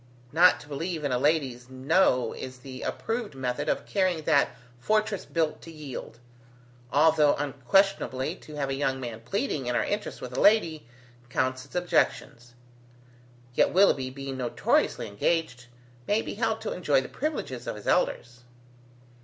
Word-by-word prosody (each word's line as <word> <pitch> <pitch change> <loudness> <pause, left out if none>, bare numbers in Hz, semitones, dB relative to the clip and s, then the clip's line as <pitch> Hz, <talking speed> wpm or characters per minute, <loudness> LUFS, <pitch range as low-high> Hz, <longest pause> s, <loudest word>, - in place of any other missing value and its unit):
Not 175 +4 +6
to - - -14
believe 160 +3 -4
in 140 - -1
a 125 - +1
lady's 135 -4 0
No 130 0 +2
is 130 0 -7
the 130 0 -9
approved 225 - -3
method 125 -2 -2
of - - -1
carrying 185 -5 0
that 150 -3 +3 0.3
fortress 215 - 0
built 160 -2 -1
to 165 - -10
yield. 145 -7 -8 0.7
Although 150 0 +5
unquestionably 145 +1 +1
to 150 - -12
have 140 -2 -2
a - - 0
young 135 -1 -1
man 120 -3 -6
pleading 150 - -2
in 125 - 0
our - - +2
interests 205 0 -3
with 125 0 -7
a - - 0
lady, 165 - +3 0.4
counts 130 0 -1
its 140 - -17
objections. 145 -8 0 1.0
Yet - - +3
Willoughby 155 -9 +4
being 135 0 -6
notoriously 125 -2 +1
engaged, 125 +3 -1 0.4
may 210 +2 +2
be - - -5
held - - -1
to - - -3
enjoy - - +2
the - - -7
privileges 130 - -4
of - - -3
his 105 - -11
elders." 120 +1 0
145 Hz, 155 wpm, -27 LUFS, 130-175 Hz, 1.0 s, Not